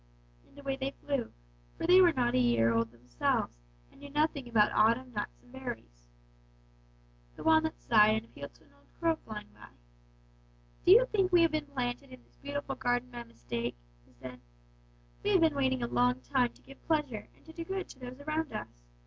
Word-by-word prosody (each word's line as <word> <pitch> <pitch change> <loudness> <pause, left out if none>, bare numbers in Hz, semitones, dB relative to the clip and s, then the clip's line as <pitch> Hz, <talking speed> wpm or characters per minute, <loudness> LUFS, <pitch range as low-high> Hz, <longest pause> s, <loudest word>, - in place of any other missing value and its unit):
"And - - -23
away 275 -1 -3
they 270 0 -2 0.2
flew, 275 -5 -1 0.5
for - - -3
they 365 +2 +7
were 350 -2 +6
not 245 -5 0
a - - +3
year 115 -2 +3
old 115 0 0
themselves, 120 - -1 0.4
and - - -20
knew 285 - -10
nothing 295 -2 0
about 215 -3 +4
autumn 235 +4 +2
nuts 205 -1 -5
and 245 - -20
berries. 240 - -8 1.3
"The - - -9
walnuts 315 0 +2
sighed 215 -1 +6
and 220 +1 -3
appealed 140 -10 -10
to - - -23
an 140 - -26
old 140 0 -27
crow 330 -1 +2
flying 215 -6 -9
by. 105 - -14 1.2
"'Do - - +7
you 485 +4 +7
think 390 -6 +1
we 350 -1 +6
have 330 - +3
been 305 -1 -2
planted 260 -1 -3
in 255 -1 -13
this - - -30
beautiful 285 -1 -4
garden 245 -1 -1
by 240 -1 -6
mistake?' 120 - -5 0.3
they - - -24
said. 125 -1 -10 0.8
'We - - +1
have - - +5
been 320 -3 +3
waiting 260 -2 +1
a - - 0
long 250 +2 +2
time 250 -3 +1
to - - -22
give 275 - -15
pleasure 295 -9 -1
and - - -26
to 320 - -12
do 335 - -5
good 380 +2 -4
to - - -13
those 255 +1 -8
around 310 +1 -2
us. - - -7
255 Hz, 200 wpm, -31 LUFS, 215-300 Hz, 1.3 s, they